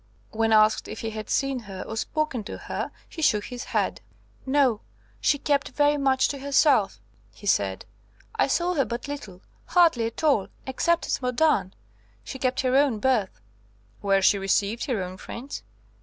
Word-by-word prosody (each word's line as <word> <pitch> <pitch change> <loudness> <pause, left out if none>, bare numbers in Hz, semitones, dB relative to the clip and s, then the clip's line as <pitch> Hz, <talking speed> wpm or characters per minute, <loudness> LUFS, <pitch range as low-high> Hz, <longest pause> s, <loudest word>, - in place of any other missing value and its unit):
When 225 0 0
asked 215 0 +4
if - - -7
he 225 - -3
had 215 0 -7
seen 275 -2 0
her 195 -4 -8
or 220 - -6
spoken 285 0 -2
to - - -6
her, - - -4 0.2
he 325 - -8
shook 215 -9 +3
his 245 -1 -7
head. - - -1 0.5
"No; 265 -5 +3 0.4
she 120 - +2
kept 285 -1 0
very 290 0 +2
much 270 -2 +3
to 280 - -4
herself," 275 - +3 0.3
he 110 - -15
said. 100 - +1 0.5
"I - - +2
saw 345 +6 +1
her 280 -6 +1
but 240 +3 -5
little, 215 -11 -7 0.2
hardly 325 -11 +4
at 230 - -7
all, 275 -11 +3 0.2
except 340 +6 +1
at - - -1
Modane. 250 - +1 0.5
She 265 - -7
kept 255 0 0
her 255 0 +1
own 275 -5 +3
berth." 210 - 0 0.6
"Where 195 -1 +2
she 200 - +4
received 200 +3 0
her 235 -9 -1
own 185 +1 -7
friends?" 255 +8 -7
250 Hz, 170 wpm, -25 LUFS, 210-285 Hz, 0.6 s, asked